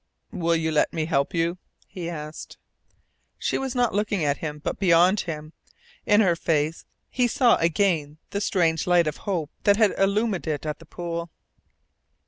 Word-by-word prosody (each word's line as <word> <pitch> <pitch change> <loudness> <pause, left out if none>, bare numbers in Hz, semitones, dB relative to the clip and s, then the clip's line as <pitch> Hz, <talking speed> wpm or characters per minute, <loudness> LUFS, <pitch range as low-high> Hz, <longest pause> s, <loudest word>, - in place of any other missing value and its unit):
"Will 170 -4 0
you 160 -1 0
let 155 - +2
me 160 -1 -1
help 140 -4 0
you?" 170 +1 -1 0.3
he 180 -4 -6
asked. 155 -2 -8 0.8
She - - -1
was 265 -2 -3
not 245 -2 +2
looking 205 -4 0
at 140 -1 +1
him, 150 -2 -4
but 150 - -4
beyond 180 +2 +4
him. 155 -2 -5 0.5
In 210 +1 +5
her 180 -5 +3
face 160 -1 -1 0.2
he 245 -1 +1
saw 240 0 +4
again 165 -3 +1
the 200 - -2
strange 165 -6 +1
light 175 -1 +4
of 155 - -3
hope 165 -6 -2
that 205 0 +4
had 215 -3 +4
illumined 200 -1 +1
it 150 -1 -2
at 150 -1 -3
the 165 - -15
pool. 170 0 -5
170 Hz, 170 wpm, -25 LUFS, 155-200 Hz, 0.8 s, In